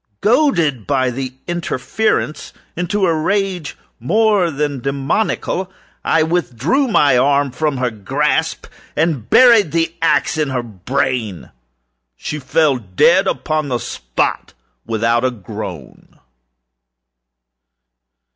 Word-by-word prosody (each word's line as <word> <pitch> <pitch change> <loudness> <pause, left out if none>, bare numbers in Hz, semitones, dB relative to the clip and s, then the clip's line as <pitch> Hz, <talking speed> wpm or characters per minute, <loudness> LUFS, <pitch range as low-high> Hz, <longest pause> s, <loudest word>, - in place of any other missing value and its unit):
Goaded, 175 - +2
by 130 -3 +1
the 130 +1 -4
interference, 175 +1 -2 0.2
into 185 +3 0
a 170 - +2
rage 185 0 -1 0.2
more 205 - +2
than 145 -2 -2
demoniacal, 140 - -1 0.3
I 160 -1 +2
withdrew 170 - 0
my 145 - +4
arm 140 +1 +2
from 150 +1 -1
her 125 -1 -1
grasp 145 +9 -1 0.3
and 150 -8 -1
buried 230 - +6
the 165 0 0
axe 165 -1 +1
in 150 -2 0
her 125 -2 -2
brain. 115 -1 -3 0.7
She 150 - -5
fell 145 0 +2
dead 95 -5 +3
upon 155 -1 -1
the 125 -3 -1
spot, 60 - -3 0.3
without 115 +1 +1
a 130 - +3
groan. 100 - -9
145 Hz, 110 wpm, -18 LUFS, 125-170 Hz, 0.7 s, buried